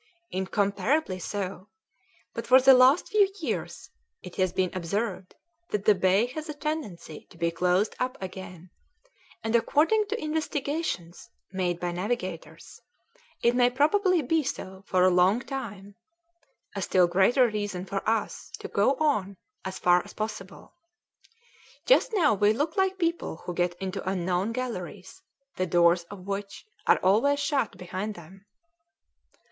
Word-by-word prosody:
"Incomparably 200 +4 0
so; 190 0 -5 0.7
but 230 - -5
for 255 +2 +8
the 265 +1 +7
last 260 +6 +5
few 405 -2 +3
years 230 - -4 0.3
it 180 - -10
has 185 -2 +2
been 185 0 0
observed 185 +1 -3 0.3
that 205 -1 -2
the 210 - +7
bay 190 +3 +3
has 305 +6 -7
a 300 - -5
tendency 290 - -5
to - - -17
be 170 0 0
closed 180 +4 +1
up 255 0 -2
again, 185 -2 -9 0.7
and 225 +1 0
according 320 - +3
to 440 +3 -3
investigations 300 - -3 0.2
made 180 -2 -1
by 175 0 -2
navigators, 185 -2 -5 0.6
it 235 +1 +4
may 245 0 +4
probably 335 +6 +2
be 320 +5 +2
so 190 -9 -6
for 185 -1 +2
a 185 - +6
long 180 +5 +4
time 230 -7 -7 0.8
a - - -3
still 185 -1 +3
greater 195 +9 +4
reason 205 -4 -3
for 195 +1 -3
us 225 -1 -2
to - - -7
go 210 +7 +2
on 210 -11 0 0.3
as 190 0 -5
far 180 0 +3
as - - -13
possible. 210 -3 -6 1.1
Just - - +4
now 345 - +3
we 205 +1 +3
look 295 +7 -2
like 380 0 +1
people 335 - -2
who 180 - -4
get 175 0 0
into 190 +1 -4
unknown 185 +2 -1
galleries, 225 - -6 0.4
the 185 - 0
doors 170 0 +3
of 185 0 -11
which 200 - -5 0.2
are - - +6
always 230 +10 +3
shut 285 -4 -1
behind 190 +4 -5
them." 190 +4 -14
205 Hz, 145 wpm, -27 LUFS, 185-270 Hz, 1.1 s, for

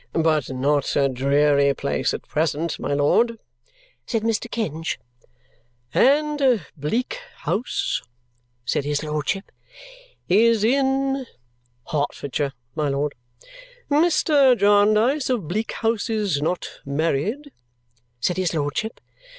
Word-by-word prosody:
"But 155 -4 +1
not 140 +2 0
a 140 -1 +3
dreary 140 +2 +3
place 140 - -1
at - - -6
present, 160 +1 -1
my 140 - -1
lord," 230 +11 +2 0.7
said 225 -3 -1
Mr. 225 +1 -1
Kenge. 165 -9 -3 1.0
"And 275 - +3
Bleak 235 - -2 0.2
House," 240 - -1 0.6
said 140 - 0
his 145 +1 -1
lordship, 155 +6 -2 0.8
"is 220 +3 +4
in 270 +1 +1 0.3
" 120 0 -40
"Hertfordshire, 145 -1 -2 0.2
my 150 -2 -1
lord." 140 +1 -1 0.8
"Mr. 295 -4 +4
Jarndyce 215 +7 +3
of 230 -11 -1
Bleak 215 +7 -2
House 225 -2 -1
is 205 -10 0
not 175 +4 -3
married?" 165 - -1 0.7
said 175 +8 0
his 180 -3 0
lordship. 150 +9 -2
180 Hz, 110 wpm, -23 LUFS, 145-235 Hz, 1.0 s, is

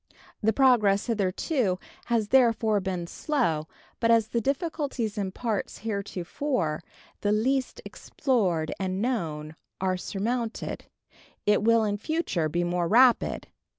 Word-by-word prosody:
The 220 0 +3
progress 220 -6 +4
hitherto 210 - 0 0.3
has 225 -3 0
therefore 230 -4 +4
been 185 -3 -3
slow; 170 - -1 0.3
but 230 - +2
as 225 -2 +4
the 235 - 0
difficulties 275 - -2
in 195 -2 -2
parts 220 0 -3
heretofore 200 - -2 0.4
the 205 - 0
least 255 +5 0
explored 190 - -1
and 190 0 -2
known 160 -10 -2 0.2
are 185 -1 0
surmounted, 225 +5 -3 0.6
it 210 0 +4
will 230 +1 +4
in 205 -1 0
future 215 - -1
be 175 +3 0
more 175 0 0
rapid. 245 +5 +4
215 Hz, 120 wpm, -27 LUFS, 185-245 Hz, 0.6 s, progress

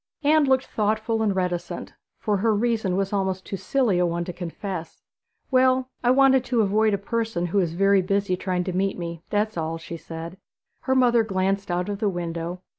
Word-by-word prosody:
Anne 305 +1 +4
looked 265 -1 +2
thoughtful 220 +1 0
and 205 -3 +1
reticent, 180 -2 -3 0.2
for 210 -3 0
her 220 +2 +2
reason 220 -4 0
was 195 +1 -1
almost 190 -1 -1
too - - -4
silly 225 -2 +1
a 180 - +3
one 170 0 -2
to 180 - -5
confess. 175 0 -6 0.5
'Well, 260 0 +3
I 240 - +3
wanted 265 0 +5
to 240 -3 +2
avoid 210 +1 +2
a - - -2
person 220 -3 -2
who 175 +4 +1
is 170 -3 -1
very 195 +1 +4
busy 195 0 0
trying 180 -1 -2
to 185 - -3
meet 195 +1 0
me 170 -2 -5
that's 210 -1 0
all,' 165 0 -2
she 165 +1 -8
said. 165 +2 -8 0.5
Her 265 - +2
mother 240 -2 +4
glanced 195 -1 -1
out 175 +1 -1
of 205 -1 -3
the 215 -2 +1
window. 170 0 -4
195 Hz, 195 wpm, -24 LUFS, 180-225 Hz, 0.5 s, wanted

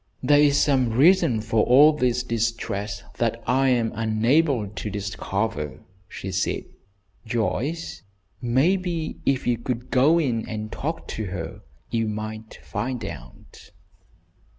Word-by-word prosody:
"There 145 +3 +5
is 145 -1 +4
some 130 -4 +3
reason 130 - +4
for 110 0 +1
all 145 +5 +7
this 125 -3 0
distress 110 -4 -2 0.2
that 115 0 0
I 135 +2 +3
am 120 -3 +2
unable 115 +3 +2
to 105 +1 -6
discover," 100 -4 -3 0.3
she 95 - -6
said. 95 0 -1 0.6
"Joyce, 120 +8 -2 0.4
maybe 165 +7 0
if 135 -1 +1
you 120 -1 0
would 125 -1 -3
go 140 +6 +5
in 120 -8 -1
and 110 -1 -5
talk 160 +3 -4
to 110 - -4
her 90 -3 -6 0.3
you 115 -1 0
might 110 +1 -6
find 125 -5 -3
out." 65 -9 -11
115 Hz, 130 wpm, -24 LUFS, 110-135 Hz, 0.6 s, all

